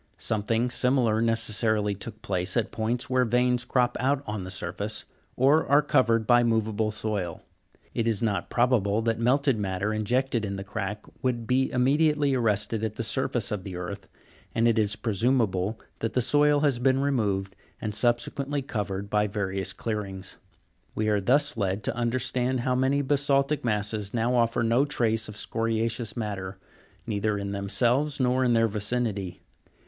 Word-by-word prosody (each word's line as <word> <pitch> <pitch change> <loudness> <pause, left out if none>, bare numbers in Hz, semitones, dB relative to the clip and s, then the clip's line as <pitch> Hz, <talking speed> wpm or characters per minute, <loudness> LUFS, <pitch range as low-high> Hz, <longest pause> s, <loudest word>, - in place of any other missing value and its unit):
Something 115 +3 0
similar 125 -4 +2
necessarily 110 -2 +1
took 105 +2 -9
place 90 +2 -1
at 115 -2 0
points 115 +2 -2
where 130 0 +2
veins 125 0 +1
crop 125 0 +1
out 135 +2 +1
on 105 -2 -4
the 90 - -7
surface, 95 +3 -4 0.3
or 140 +5 +4
are 145 +2 +5
covered 115 -6 +2
by 120 +2 +5
moveable 110 -2 +1
soil 105 -5 -3
(fig. - - -27
290); - - -4
it 115 - +1
is 110 -3 +1
not 105 -3 -1
probable 115 -4 +2
that 115 0 0
melted 130 0 +2
matter 100 +1 -1
injected 120 +2 0
in 100 -1 -3
the 95 - -5
crack 105 0 -5 0.2
would 125 -3 -1
be 130 +3 +2
immedi 145 +5 +3
ately 145 -2 +1
arrested 110 -2 0
at 110 -1 -2
the 115 - -3
surface 120 -2 -1
of 105 -3 -3
the 95 -2 -7
earth, 95 +2 -6 0.5
and 115 +1 +3
it 115 -1 +3
is 105 -1 +1
presumable 110 -2 0 0.2
that 115 - -2
the - - +2
soil 145 +3 +3
has 140 -5 +2
been 130 +1 +3
removed 105 -9 0 0.2
and 105 -1 -3
subsequently 135 +5 0
covered 100 -6 -3
by 105 +1 +1
various 100 -2 -2
clearings. 100 -4 -5 0.6
We 110 0 0
are 105 -1 +2
thus 145 +7 +3
led 100 0 -1
to - - -2
understand 125 +1 0
how 130 +1 -1
so - - +1
many 135 +2 +2
basa'ltic 140 +1 +1
masses 105 -1 -1
now 120 +2 +1
offer 115 -1 +2
no 115 +4 +3
trace 115 -6 0
of 105 - -8
scoria'ceous 115 0 -2
matter, 100 -4 -4 0.5
neither 105 -1 -1
in 100 0 -4
themselves 120 +9 +1
nor 130 0 +2
in 125 -2 +3
their 115 0 +4
vicinity. 105 -4 -2
115 Hz, 170 wpm, -27 LUFS, 105-125 Hz, 0.6 s, are